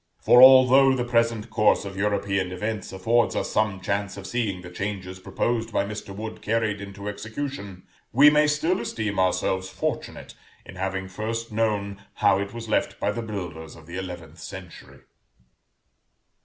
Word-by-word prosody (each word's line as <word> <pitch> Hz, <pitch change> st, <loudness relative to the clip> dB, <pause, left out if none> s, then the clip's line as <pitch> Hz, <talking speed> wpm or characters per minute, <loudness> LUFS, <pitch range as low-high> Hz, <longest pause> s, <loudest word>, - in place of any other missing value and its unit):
For, 125 Hz, -, +6 dB
although, 130 Hz, +1 st, +8 dB
the 125 Hz, -, -1 dB
present 115 Hz, -2 st, 0 dB
course 105 Hz, -2 st, +3 dB
of 100 Hz, -1 st, -7 dB
European 100 Hz, -2 st, -1 dB
events 105 Hz, +2 st, -4 dB
affords 115 Hz, +5 st, +1 dB
us -, -, -2 dB
some 105 Hz, -3 st, 0 dB
chance 100 Hz, +1 st, -2 dB
of 100 Hz, -, -8 dB
seeing 105 Hz, -7 st, -2 dB
the 90 Hz, -, -9 dB
changes 95 Hz, -1 st, -5 dB
proposed 115 Hz, +4 st, -2 dB
by 100 Hz, -, 0 dB
Mr. 105 Hz, 0 st, -7 dB
Wood 110 Hz, +2 st, -7 dB
carried 110 Hz, -2 st, -1 dB
into 100 Hz, 0 st, -8 dB
execution, 105 Hz, -2 st, -6 dB, 0.3 s
we 145 Hz, +4 st, +7 dB
may 150 Hz, 0 st, +4 dB
still 160 Hz, +5 st, +1 dB
esteem 105 Hz, -3 st, -3 dB
ourselves 95 Hz, 0 st, 0 dB
fortunate -, -, -4 dB, 0.3 s
in -, -, -11 dB
having 95 Hz, 0 st, -3 dB
first 110 Hz, +4 st, -4 dB
known 105 Hz, -3 st, -1 dB
how 95 Hz, -, +3 dB
it 100 Hz, 0 st, -4 dB
was 115 Hz, -1 st, -7 dB
left 110 Hz, -, 0 dB
by -, -, 0 dB
the 120 Hz, -, -4 dB
builders 90 Hz, -8 st, -6 dB
of 80 Hz, -, -15 dB
the 85 Hz, +2 st, -9 dB
eleventh 85 Hz, -3 st, -8 dB
century. 90 Hz, 0 st, -10 dB
105 Hz, 160 wpm, -25 LUFS, 95-115 Hz, 0.3 s, although